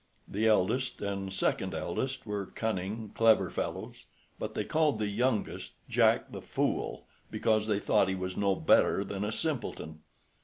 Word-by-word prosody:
The 110 +3 0
eldest 110 +5 +2
and 100 -1 -3
second 95 -1 0
eldest 130 +12 -3
were 105 -3 -3
cunning, 110 0 -3
clever 115 -1 +4
fellows, - - -5 0.3
but - - -4
they - - 0
called 155 -5 +2
the 105 - -1
youngest 115 +1 -1
Jack - - +3
the - - -7
Fool, - - -2 0.2
because 110 -1 +1
they 105 -2 +2
thought 100 - +2
he 95 - 0
was 95 0 -4
no 100 -1 +2
better 95 +3 +4
than 100 0 -4
a 105 - -1
simpleton. 115 - -3
105 Hz, 155 wpm, -30 LUFS, 95-115 Hz, 0.3 s, clever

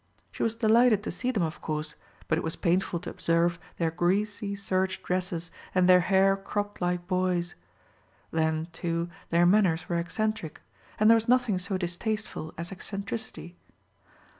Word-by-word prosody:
She - - -8
was 225 0 +1
delighted 225 -1 +4
to - - -3
see 250 - -2
them 215 -8 +1
of 160 -1 -4
course; 155 -1 -3 0.3
but 160 - +2
it - - -4
was 160 - -3
painful 175 0 +1
to - - -6
observe 170 +1 +1 0.2
their 165 -1 0
greasy 200 +4 0
serge 190 -1 -1
dresses 180 -2 -2 0.2
and 180 -1 +4
their 180 0 +8
hair 195 +2 +4
cropped 205 +1 -4
like 175 0 0
boys. 180 -2 0 0.8
Then, 160 0 0
too, 170 0 -2 0.2
their 170 +1 +4
manners 180 -4 +3
were 170 -1 0
eccentric; 215 0 -3 0.4
and 215 - +5
there 225 - +9
was 225 0 0
nothing 245 -6 +3
so 190 +1 -2
distasteful 180 -1 -3
as 170 +2 -5
eccentricity. 195 -2 -5
185 Hz, 160 wpm, -28 LUFS, 170-205 Hz, 0.8 s, there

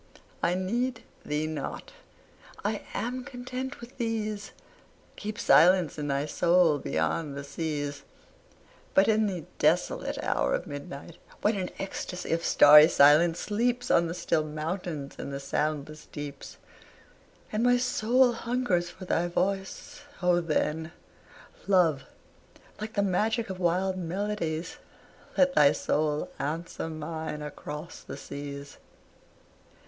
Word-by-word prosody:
I 175 +1 +2
need 230 +6 -1 0.2
thee 150 +1 -1
not, 155 -2 -5 0.7
I 210 0 -1
am 250 +2 -2
content 255 +2 -6
with 240 +2 -12
these: 215 -3 -2 0.6
Keep 215 0 -5
silence 175 -4 +5
in 145 - -2
thy 140 0 0
soul, 170 0 +3
beyond 140 - -1
the 140 - -5
seas! 145 -1 -3 0.9
But 195 - +6
in 220 -1 +3
the 180 -6 -4
desolate - - +1
hour - - +1
of - - -4
midnight, 145 +3 -8 0.3
when 210 +1 +3
An 185 -2 -2
ecstasy 190 -1 -5
of 165 0 0
starry 150 0 +8
silence 160 +3 +5
sleeps 240 +4 0
On 170 0 +4
the 165 - -4
still 155 -3 +1
mountains 155 -1 -4
and - - -5
the 140 - -4
soundless 150 +2 -3
deeps, 145 -1 -8 0.9
And 215 - 0
my 245 +1 +5
soul 250 0 +3
hungers 230 -7 0
for 185 +1 -10
thy 175 -1 +1
voice, 190 +9 -2 0.2
O 180 -1 +4
then, 160 0 -1 0.7
Love, 170 -8 +3 0.7
like 215 +1 -5
the 200 - +1
magic 215 +3 0
of 185 - -6
wild 185 +2 +1
melodies, 180 -2 -3 0.6
Let 275 -1 +4
thy 145 - +6
soul 150 0 -1
answer 160 +3 -3
mine 155 -1 -5
across 150 +2 -7
the - - -8
seas. 140 0 -8
175 Hz, 125 wpm, -28 LUFS, 150-210 Hz, 0.9 s, starry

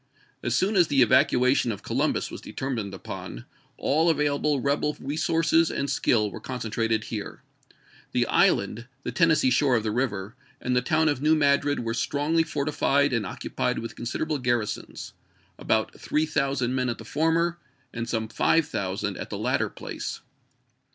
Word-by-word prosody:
As 120 0 -1
soon 195 +9 +1
as 175 -4 +5
the 135 -3 +4
evacuation 125 +2 +3
of 100 - -7
Co - - -5
lumbus - - 0
was - - -7
determined 120 -7 -4
upon, 80 -9 -8 0.3
all 160 +4 +2
available 150 -2 +1
rebel 145 +3 0
resources 165 +2 +2
and 140 0 -2
skill 110 -6 +2
were - - -7
concentrated 115 -3 -2
here. 110 -3 -6 0.7
The - - +2
island, 115 +1 +2 0.2
the - - -3
Tennessee 160 -6 +3
shore 130 0 +3
of 115 - +1
the 110 - -1
river, 110 -3 -2 0.2
and 125 - -1
the 125 - +3
town 155 +5 +2
of 145 -4 0
New 155 +2 +4
Madrid 145 -1 +2
were 115 -1 -2
strongly 145 +6 +1
fortified 145 -2 +1
and 110 -5 0
occupied - - -2
with 115 - -5
considerable 150 +5 -2
garrisons 120 -4 -2 0.2
— - - -36
about 110 0 0
3000 140 -5 0
men 130 -1 0
at 120 - -3
the 110 - -10
former 165 +5 +1 0.3
and 115 0 -4
some 110 -1 -1
5000 110 - 0
at - - -6
the - - -4
latter - - 0
place. - - -6
135 Hz, 160 wpm, -26 LUFS, 115-150 Hz, 0.7 s, as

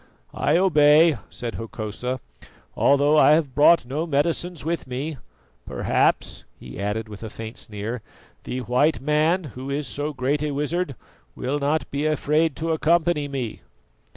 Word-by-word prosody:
"I 155 - +2
obey," 155 -3 +5
said 120 -2 -6
Hokosa, 115 +3 -5 0.6
"although 145 +2 +4
I 150 - +7
have 155 -4 +1
brought 150 0 +5
no 150 +7 -3
medicines 165 +2 -1
with 165 -3 -2
me. 135 +4 -4 0.5
Perhaps," - - 0 0.2
he 60 0 -10
added 105 +2 -2
with 105 -1 -10
a 110 - -6
faint 110 +1 -8
sneer, 110 +2 -5 0.4
"the 130 - -4
white 125 +3 +2
man, 155 +6 +2
who 130 +2 -7
is 140 +1 -2
so 145 +3 -2
great 140 +1 -1
a 150 - -1
wizard, 150 +1 -2 0.4
will 135 +3 -2
not 145 +3 -1
be 145 +2 -1
afraid 155 0 +1
to 165 +1 -2
accompany 160 -1 +2
me." 130 -5 -5
145 Hz, 150 wpm, -23 LUFS, 125-155 Hz, 0.6 s, I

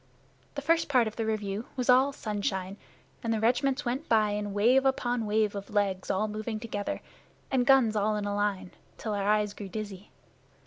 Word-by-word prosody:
The - - -4
first 330 -1 +2
part 250 -4 +4
of 220 - -5
the 225 -1 -2
review 210 0 -2
was 250 -2 -2
all 260 +3 +5
sunshine, 200 -5 -3 0.5
and 230 - -1
the 225 - +1
regiments 260 +5 +1
went 255 +6 -3
by 215 -2 +4
in 205 0 -2
wave 235 +7 +4
upon 245 -4 0
wave 210 0 +1
of 200 -1 -6
legs 200 -3 0
all 205 +3 +1
moving 215 +1 -4
together, 205 -2 -4 0.5
and 250 -2 +2
guns 260 -5 +5
all 210 +1 +1
in 210 -1 -2
a 205 - -1
line, 205 -3 -1 0.3
till 215 - -3
our 200 0 0
eyes 210 -1 +2
grew 205 -2 -8
dizzy. 205 -1 -6
215 Hz, 190 wpm, -29 LUFS, 205-240 Hz, 0.5 s, all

